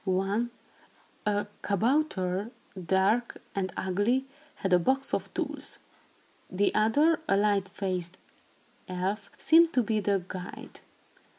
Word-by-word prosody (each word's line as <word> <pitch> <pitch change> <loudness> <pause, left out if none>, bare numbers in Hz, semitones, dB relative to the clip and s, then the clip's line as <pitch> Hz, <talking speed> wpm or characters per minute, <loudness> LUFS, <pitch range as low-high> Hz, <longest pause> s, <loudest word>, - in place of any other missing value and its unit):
One, 195 +5 0 0.8
a 205 0 +1 0.2
kabouter, 205 -3 +1 0.4
dark 205 +6 +2
and 190 -1 -1
ugly, 205 +8 +1 0.3
had 190 -2 -1
a 180 - +7
box 270 +9 0
of - - -1
tools. - - -3 0.7
The 195 +2 +1
other, 290 +10 +4
a 195 - +4
light 200 -2 +2
faced 185 -2 -3 0.7
elf, 190 +3 -3
seemed 330 +1 +5
to 250 - +3
be 215 0 0
the 200 -2 +1
guide. 180 -1 -8
200 Hz, 115 wpm, -29 LUFS, 190-235 Hz, 0.8 s, a